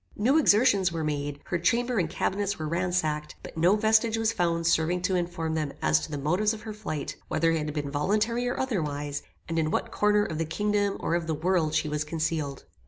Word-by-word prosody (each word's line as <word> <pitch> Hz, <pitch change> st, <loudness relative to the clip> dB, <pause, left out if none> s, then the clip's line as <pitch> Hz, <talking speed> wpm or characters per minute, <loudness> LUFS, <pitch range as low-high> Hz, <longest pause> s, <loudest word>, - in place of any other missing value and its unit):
"New 260 Hz, +9 st, +3 dB
exertions 205 Hz, -, +4 dB
were 165 Hz, -1 st, -3 dB
made, 145 Hz, -1 st, -2 dB
her 175 Hz, -, -1 dB
chamber 235 Hz, +6 st, +1 dB
and 165 Hz, -4 st, 0 dB
cabinets 200 Hz, +4 st, -1 dB
were 155 Hz, -, -4 dB
ransacked, 165 Hz, -3 st, -1 dB
but -, -, -9 dB
no 175 Hz, +5 st, +4 dB
vestige 220 Hz, +1 st, +3 dB
was 225 Hz, 0 st, +1 dB
found 170 Hz, -1 st, 0 dB
serving 170 Hz, +2 st, +2 dB
to 185 Hz, -, +1 dB
inform 170 Hz, -2 st, -2 dB
them 155 Hz, -3 st, -1 dB
as 75 Hz, 0 st, +3 dB
to -, -, -6 dB
the 150 Hz, -, -3 dB
motives 180 Hz, +10 st, +1 dB
of 215 Hz, -, -11 dB
her 220 Hz, -1 st, -6 dB
flight, 180 Hz, -9 st, -5 dB
whether 165 Hz, 0 st, +2 dB
it 165 Hz, -, +1 dB
had 150 Hz, -, -3 dB
been 145 Hz, -2 st, -3 dB
voluntary 215 Hz, +11 st, 0 dB
or 245 Hz, -, -2 dB
otherwise, 150 Hz, -, -2 dB, 0.3 s
and 165 Hz, 0 st, -1 dB
in 155 Hz, -1 st, +1 dB
what -, -, -1 dB
corner 210 Hz, 0 st, +3 dB
of 160 Hz, -5 st, -4 dB
the 165 Hz, -, 0 dB
kingdom 205 Hz, +4 st, 0 dB
or -, -, -1 dB
of 170 Hz, -1 st, 0 dB
the 160 Hz, -, 0 dB
world 160 Hz, -1 st, +1 dB
she 155 Hz, -, +1 dB
was 150 Hz, 0 st, -1 dB
concealed. 155 Hz, -3 st, -2 dB
170 Hz, 220 wpm, -27 LUFS, 155-210 Hz, 0.3 s, exertions